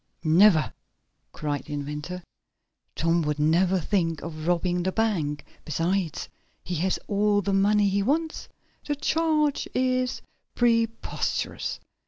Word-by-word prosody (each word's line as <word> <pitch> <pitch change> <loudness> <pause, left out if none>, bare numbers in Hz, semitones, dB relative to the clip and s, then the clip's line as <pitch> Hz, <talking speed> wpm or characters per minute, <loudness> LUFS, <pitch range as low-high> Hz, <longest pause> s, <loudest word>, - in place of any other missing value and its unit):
"Never!" 165 0 +5 0.6
cried 145 -2 -3
the 150 - -7
inventor. 150 +5 -5 0.7
"Tom 165 +1 +2
would 150 -1 -1
never 175 +5 +3
think 165 -3 0
of 155 -1 -6
robbing 175 0 +1
the 190 +2 0
bank. 170 -10 -1 0.2
Besides, 165 +2 -1 0.4
he 180 - -5
has 185 +4 +1
all 205 0 +2
the 200 - 0
money 205 +1 +4
he 200 +1 +1
wants. 315 +9 -1 0.3
The 295 - -2
charge 305 -1 +1
is 255 0 0 0.3
preposterous! 230 -1 0
185 Hz, 120 wpm, -26 LUFS, 160-220 Hz, 0.7 s, Never